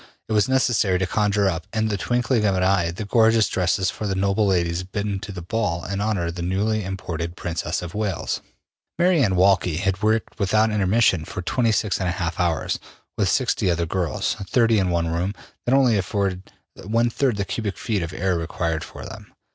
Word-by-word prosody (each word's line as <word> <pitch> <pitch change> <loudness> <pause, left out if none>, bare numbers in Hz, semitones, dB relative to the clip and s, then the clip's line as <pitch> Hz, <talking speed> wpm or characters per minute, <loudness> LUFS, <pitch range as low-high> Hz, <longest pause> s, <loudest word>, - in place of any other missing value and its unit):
It 110 - -2
was 105 +4 +3
necessary 120 -8 +2
to 95 - 0
conjure 105 +1 +1
up 85 -3 -2
in 110 -1 0
the 105 - 0
twinkling 120 +2 0
of 100 -2 +2
an 90 - +1
eye 95 -2 +2
the 90 +5 -5
gorgeous 115 0 +4
dresses 95 +1 +1
for 105 - -5
the 95 - -1
noble 100 +2 +1
ladies 85 -2 +1
bidden 100 +1 -3
to 100 - -7
the 90 -3 -7
ball 90 -3 -1
in 100 +1 -3
honor 105 -5 0
of 85 - -3
the 90 - -6
newly 100 +5 0
imported 85 -3 -4
Princess 85 0 -3
of 90 0 -7
Wales. 105 -3 -2 0.6
Mary 175 -3 +4
Anne 95 -5 +2
Walkley 90 -3 +3
had 95 +1 -1
worked 110 +1 0
without 110 +2 +2
intermission 100 -3 +2
for 95 - -6
26 110 -1 +1
1/2 90 -2 -2
hours, 85 -5 0 0.4
with 100 -4 +1
60 125 -5 +1
other 85 -1 +1
girls, 85 -3 -1
30 115 -3 +3
in 95 -2 +1
one 85 -1 0
room, 85 +5 -1 0.3
that 130 - +4
only 125 -6 +4
afforded 95 -1 -2 0.3
1/3 115 +6 +1
of 110 - -2
the 100 - -1
cubic 105 -1 -3
feet 105 -5 -1
of 85 0 -4
air 95 0 0
required 80 -1 -2
for - - -9
them. - - -10
100 Hz, 195 wpm, -23 LUFS, 90-110 Hz, 0.6 s, gorgeous